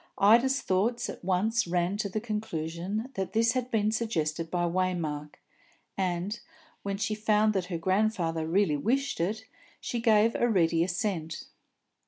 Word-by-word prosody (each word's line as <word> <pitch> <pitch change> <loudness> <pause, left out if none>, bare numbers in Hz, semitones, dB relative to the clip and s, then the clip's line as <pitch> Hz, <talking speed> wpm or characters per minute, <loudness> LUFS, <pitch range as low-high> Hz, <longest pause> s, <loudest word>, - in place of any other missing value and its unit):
Ida's 240 +7 +5
thoughts 230 +6 0
at - - -12
once 205 +5 +1
ran 175 +2 0
to 205 -1 -2
the 215 - -2
conclusion 210 0 -4
that 190 -3 -4
this 225 +1 +3
had 250 0 -2
been 215 -3 +1
suggested 165 -8 -1
by 175 0 -1
Waymark, 170 -5 -2 0.6
and, 185 +3 -2 0.4
when 200 0 -3
she 210 +1 -1
found 215 0 +2
that 190 -3 -1
her 180 -2 -4
grandfather 175 -3 0
really 170 -3 +2
wished 270 - 0
it, 215 +6 -2 0.6
gave 225 0 +4
a 240 - +1
ready 170 -5 +3
assent. 175 -3 -3
195 Hz, 145 wpm, -28 LUFS, 170-220 Hz, 0.6 s, Ida's